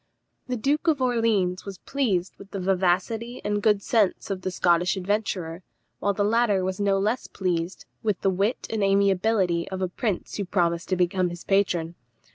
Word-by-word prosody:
The 250 Hz, -, -1 dB
Duke 290 Hz, +8 st, 0 dB
of 310 Hz, -4 st, +3 dB
Orleans 225 Hz, -7 st, +1 dB
was 195 Hz, -2 st, -7 dB
pleased 195 Hz, -8 st, -1 dB
with 200 Hz, -, -12 dB
the 195 Hz, -, -5 dB
vivacity 195 Hz, +6 st, 0 dB
and 205 Hz, 0 st, 0 dB
good 205 Hz, -2 st, +3 dB
sense 215 Hz, -4 st, +1 dB
of 190 Hz, -1 st, -3 dB
the 185 Hz, -, -2 dB
Scottish 180 Hz, +1 st, +2 dB
adventurer, 185 Hz, -3 st, -2 dB, 0.4 s
while 200 Hz, -, +1 dB
the 205 Hz, -, +1 dB
latter 210 Hz, -2 st, +2 dB
was 185 Hz, +1 st, -2 dB
no 200 Hz, -1 st, +2 dB
less 215 Hz, +6 st, 0 dB
pleased 180 Hz, -2 st, -2 dB, 0.2 s
with 210 Hz, -3 st, 0 dB
the 195 Hz, -, +2 dB
wit 200 Hz, +6 st, 0 dB
and 220 Hz, -2 st, 0 dB
amiability 195 Hz, -2 st, +2 dB
of 190 Hz, -, -4 dB
a 185 Hz, -, 0 dB
prince 195 Hz, +1 st, -3 dB
who 200 Hz, -, -2 dB
promised 170 Hz, -2 st, 0 dB
to 185 Hz, -, +2 dB
become 180 Hz, 0 st, +1 dB
his 175 Hz, 0 st, -8 dB
patron. 175 Hz, -4 st, +1 dB
195 Hz, 180 wpm, -25 LUFS, 180-215 Hz, 0.4 s, of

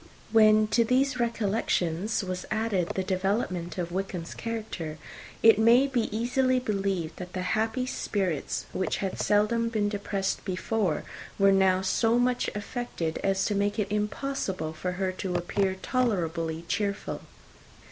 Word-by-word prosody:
When 215 Hz, -1 st, +6 dB
to 235 Hz, +2 st, +4 dB
these 255 Hz, +2 st, +1 dB
recollections 210 Hz, -4 st, 0 dB
was 185 Hz, -1 st, -4 dB
added 215 Hz, -5 st, 0 dB
the 190 Hz, -, 0 dB
development 185 Hz, -2 st, -1 dB
of 175 Hz, -1 st, -3 dB
Wickham's 180 Hz, -2 st, -4 dB
character, 215 Hz, -9 st, -5 dB, 0.5 s
it 225 Hz, -2 st, +7 dB
may 235 Hz, +4 st, +6 dB
be 255 Hz, -5 st, 0 dB
easily 255 Hz, +2 st, +2 dB
believed 195 Hz, -8 st, -1 dB
that 180 Hz, -1 st, -8 dB
the 185 Hz, -, -2 dB
happy 225 Hz, +4 st, 0 dB
spirits 190 Hz, -, -2 dB
which 185 Hz, -, -1 dB
had 195 Hz, -1 st, -3 dB
seldom 220 Hz, +3 st, +2 dB
been 215 Hz, -2 st, 0 dB
depressed 200 Hz, -1 st, -2 dB
before 185 Hz, -1 st, -1 dB, 0.3 s
were 195 Hz, -1 st, +5 dB
now 190 Hz, -1 st, +4 dB
so 225 Hz, +5 st, +2 dB
much 245 Hz, 0 st, +1 dB
affected 205 Hz, -6 st, -3 dB
as 195 Hz, -1 st, +1 dB
to 210 Hz, -, 0 dB
make 205 Hz, +1 st, 0 dB
it 210 Hz, -2 st, 0 dB
almost 210 Hz, 0 st, +2 dB
impossible 200 Hz, -, -3 dB
for 180 Hz, +3 st, -3 dB
her 185 Hz, +1 st, -1 dB
to 185 Hz, -1 st, -4 dB
appear 190 Hz, +2 st, 0 dB
tolerably 170 Hz, -9 st, -1 dB
cheerful. 200 Hz, 0 st, -2 dB
200 Hz, 145 wpm, -28 LUFS, 185-225 Hz, 0.5 s, it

